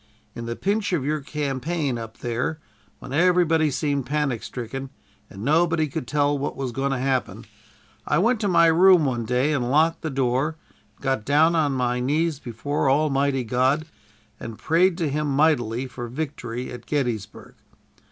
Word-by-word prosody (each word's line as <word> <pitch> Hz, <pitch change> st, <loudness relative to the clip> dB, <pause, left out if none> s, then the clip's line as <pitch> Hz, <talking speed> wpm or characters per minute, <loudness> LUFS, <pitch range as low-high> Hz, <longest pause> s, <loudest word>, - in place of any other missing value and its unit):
In 115 Hz, 0 st, -7 dB
the 115 Hz, -, -3 dB
pinch 200 Hz, -, -1 dB
of 145 Hz, -7 st, 0 dB
your 155 Hz, +1 st, 0 dB
campaign 145 Hz, -1 st, -2 dB
up 115 Hz, 0 st, -8 dB
there, 120 Hz, +7 st, -2 dB, 0.4 s
when 130 Hz, -, -9 dB
everybody 165 Hz, -1 st, +3 dB
seemed 140 Hz, -2 st, -1 dB
panic 145 Hz, -5 st, -1 dB
stricken, 135 Hz, +2 st, -6 dB, 0.4 s
and 95 Hz, -, -9 dB
nobody 160 Hz, +1 st, +2 dB
could 130 Hz, -3 st, -5 dB
tell 145 Hz, +1 st, +1 dB
what 145 Hz, +1 st, -3 dB
was 130 Hz, -2 st, -3 dB
going 135 Hz, +3 st, -1 dB
to 135 Hz, -, 0 dB
happen, 130 Hz, 0 st, -2 dB, 0.6 s
I -, -, +2 dB
went 230 Hz, +7 st, +2 dB
to 210 Hz, -, 0 dB
my 170 Hz, -3 st, +5 dB
room 170 Hz, 0 st, +6 dB
one 120 Hz, -4 st, -1 dB
day 125 Hz, +6 st, +1 dB
and 125 Hz, -4 st, -1 dB
locked 160 Hz, +4 st, +2 dB
the 160 Hz, -, -3 dB
door, 135 Hz, +3 st, 0 dB, 0.4 s
and -, -, -23 dB
got 135 Hz, -5 st, 0 dB
down 155 Hz, +6 st, +3 dB
on 150 Hz, -4 st, +2 dB
my 125 Hz, -1 st, 0 dB
knees 150 Hz, +4 st, 0 dB
before 135 Hz, +4 st, -2 dB
Almighty 140 Hz, -2 st, +1 dB
God, 130 Hz, +6 st, +1 dB, 0.5 s
and 115 Hz, -2 st, -7 dB
prayed 175 Hz, +2 st, +2 dB
to 165 Hz, -4 st, 0 dB
him 150 Hz, +1 st, -1 dB
mightily 135 Hz, -5 st, +1 dB
for 125 Hz, -2 st, -7 dB
victory 125 Hz, -3 st, -5 dB
at 125 Hz, -, -10 dB
Gettysburg. 120 Hz, -9 st, -3 dB
140 Hz, 170 wpm, -24 LUFS, 125-155 Hz, 0.6 s, room